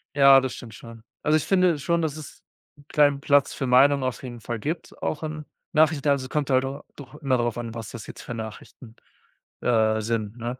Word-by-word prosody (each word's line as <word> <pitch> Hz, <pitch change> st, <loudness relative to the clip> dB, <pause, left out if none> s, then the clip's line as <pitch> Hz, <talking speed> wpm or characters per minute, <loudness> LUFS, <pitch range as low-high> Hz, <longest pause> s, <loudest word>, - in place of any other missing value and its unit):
Ja, 140 Hz, -1 st, +8 dB
das 130 Hz, -1 st, -4 dB
stimmt 115 Hz, -3 st, -10 dB
schon. 115 Hz, 0 st, -12 dB, 0.2 s
Also, 155 Hz, +1 st, +3 dB
ich 155 Hz, -, 0 dB
finde 180 Hz, -4 st, +3 dB
schon, 170 Hz, +4 st, 0 dB
dass 155 Hz, -2 st, -2 dB
es 155 Hz, -, -11 dB, 0.4 s
'n 145 Hz, -, -19 dB
kleinen 145 Hz, -2 st, +3 dB
Platz 145 Hz, -1 st, +3 dB
für 135 Hz, -, -3 dB
Meinungen 135 Hz, +2 st, +5 dB
auf 130 Hz, +3 st, -3 dB
jeden 120 Hz, -3 st, -8 dB
Fall 115 Hz, +1 st, -4 dB
gibt, 155 Hz, +10 st, -5 dB
auch 155 Hz, -, -2 dB
in 155 Hz, -1 st, -5 dB, 0.3 s
Nachrichten, 155 Hz, -2 st, +3 dB
also, 140 Hz, -2 st, +2 dB
es 130 Hz, -, -10 dB
kommt 150 Hz, -2 st, -1 dB
halt 130 Hz, 0 st, +3 dB
a 135 Hz, +2 st, -5 dB
doch 140 Hz, 0 st, -12 dB
immer 135 Hz, -4 st, 0 dB
darauf 120 Hz, -1 st, -1 dB
an, 115 Hz, -1 st, -5 dB
was 115 Hz, -3 st, -7 dB
das 115 Hz, -, -9 dB
jetzt -, -, -10 dB
für 125 Hz, -, -6 dB
Nachrichten, 110 Hz, +1 st, -9 dB, 0.7 s
äh, 110 Hz, -2 st, +2 dB
sind, 110 Hz, 0 st, -3 dB
ne? 120 Hz, +2 st, -5 dB
135 Hz, 220 wpm, -25 LUFS, 115-145 Hz, 0.7 s, Ja